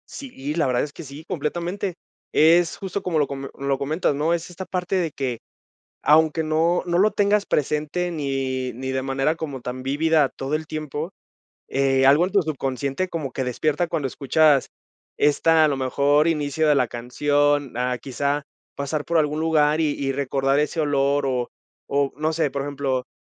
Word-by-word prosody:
Sí, 150 Hz, -, -6 dB
la 160 Hz, -5 st, +1 dB
verdad 125 Hz, -1 st, +1 dB
es 145 Hz, -, -6 dB
que -, -, -9 dB
sí, 145 Hz, +2 st, -10 dB
completamente. 175 Hz, +4 st, -3 dB, 0.4 s
Es 165 Hz, +2 st, +4 dB
justo 195 Hz, +1 st, -4 dB
como 170 Hz, -4 st, 0 dB
lo 145 Hz, -, +2 dB
come 135 Hz, 0 st, -6 dB
lo 140 Hz, 0 st, -1 dB
comentas, 145 Hz, +2 st, 0 dB
¿no? 155 Hz, +4 st, +1 dB
Es 170 Hz, 0 st, -3 dB
esta 180 Hz, +2 st, -7 dB
parte 180 Hz, 0 st, -2 dB
de 175 Hz, -4 st, 0 dB
que 130 Hz, -5 st, -3 dB, 0.6 s
aunque 160 Hz, +1 st, +4 dB
no 160 Hz, +3 st, +1 dB
no 175 Hz, -1 st, 0 dB
lo 210 Hz, +4 st, +4 dB
tengas 205 Hz, 0 st, +2 dB
presente 150 Hz, +5 st, -1 dB
ni 135 Hz, -4 st, -2 dB
ni 130 Hz, +3 st, -4 dB
de 130 Hz, 0 st, -1 dB
manera 135 Hz, +4 st, 0 dB
como 145 Hz, -6 st, -6 dB
tan 125 Hz, +1 st, -6 dB
vívida 150 Hz, +1 st, +2 dB
todo 135 Hz, +3 st, -3 dB
el 155 Hz, 0 st, -4 dB
tiempo, 155 Hz, +2 st, -4 dB, 0.6 s
eh, 135 Hz, -1 st, +2 dB
algo 145 Hz, +5 st, +6 dB
en 185 Hz, -, -6 dB
tu 200 Hz, -, +4 dB
subconsciente 140 Hz, +2 st, -2 dB
como 155 Hz, -7 st, -4 dB
que 130 Hz, -, -2 dB
despierta 155 Hz, +7 st, 0 dB
cuando 145 Hz, -5 st, -1 dB
escuchas 145 Hz, +1 st, +3 dB, 0.5 s
esta, 160 Hz, +2 st, +4 dB
a -, -, +4 dB
lo 140 Hz, -, 0 dB
mejor, 140 Hz, +4 st, +2 dB
inicio 155 Hz, 0 st, 0 dB
de 150 Hz, -, +5 dB
la 125 Hz, -, +3 dB
canción, 145 Hz, +4 st, 0 dB
ah, 125 Hz, 0 st, -1 dB
quizá 140 Hz, +2 st, -2 dB, 0.3 s
pasar 145 Hz, +1 st, -2 dB
por 170 Hz, 0 st, +1 dB
algún 150 Hz, 0 st, +1 dB
lugar 155 Hz, -1 st, +2 dB
y 155 Hz, -2 st, +2 dB
y 135 Hz, -1 st, -2 dB
recordar 135 Hz, 0 st, 0 dB
ese 150 Hz, +2 st, 0 dB
olor 140 Hz, -1 st, +1 dB
o 125 Hz, -2 st, -1 dB, 0.4 s
o, 140 Hz, 0 st, +1 dB
no 155 Hz, +2 st, -1 dB
sé, 155 Hz, -3 st, +1 dB
por 140 Hz, +1 st, -3 dB
ejemplo, 135 Hz, -3 st, -2 dB
145 Hz, 185 wpm, -23 LUFS, 135-160 Hz, 0.6 s, algo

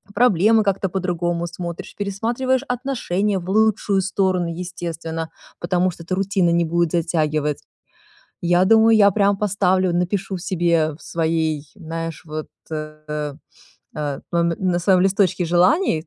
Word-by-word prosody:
проблемы 220 Hz, -1 st, +4 dB
как-то 195 Hz, -1 st, 0 dB
по-другому 175 Hz, -2 st, -2 dB
смотришь. 170 Hz, 0 st, -7 dB
Пересматриваешь 235 Hz, +6 st, -1 dB
отношения 220 Hz, -6 st, -1 dB
в 180 Hz, +1 st, -8 dB
лучшую 210 Hz, -1 st, +2 dB
сторону, 185 Hz, -2 st, 0 dB
естественно, 165 Hz, -2 st, -5 dB, 0.3 s
потому 180 Hz, +1 st, +1 dB
что 170 Hz, -, -11 dB
это 185 Hz, +2 st, -2 dB
рутина 190 Hz, -2 st, +1 dB
не 170 Hz, 0 st, +2 dB
будет 170 Hz, 0 st, 0 dB
затягивать. 155 Hz, -3 st, 0 dB, 0.8 s
Я 175 Hz, +1 st, +3 dB
думаю, 225 Hz, +2 st, +5 dB
я 200 Hz, -1 st, +6 dB
прямо 200 Hz, 0 st, +2 dB
поставлю 190 Hz, -2 st, +1 dB
напишу 185 Hz, +2 st, -1 dB
себе 170 Hz, -3 st, +1 dB
в -, -, -18 dB
своей, 160 Hz, -2 st, -1 dB
знаешь, 165 Hz, 0 st, -6 dB
вот, 155 Hz, 0 st, -5 dB, 0.2 s
э, 155 Hz, -1 st, -5 dB
э, 150 Hz, -1 st, -3 dB, 0.6 s
э, 145 Hz, -2 st, -3 dB
мом 170 Hz, 0 st, +2 dB
на 180 Hz, -2 st, +1 dB
своём 180 Hz, 0 st, +3 dB
листочке 190 Hz, -2 st, +2 dB
желаний 175 Hz, -, +2 dB
180 Hz, 135 wpm, -21 LUFS, 165-195 Hz, 0.8 s, я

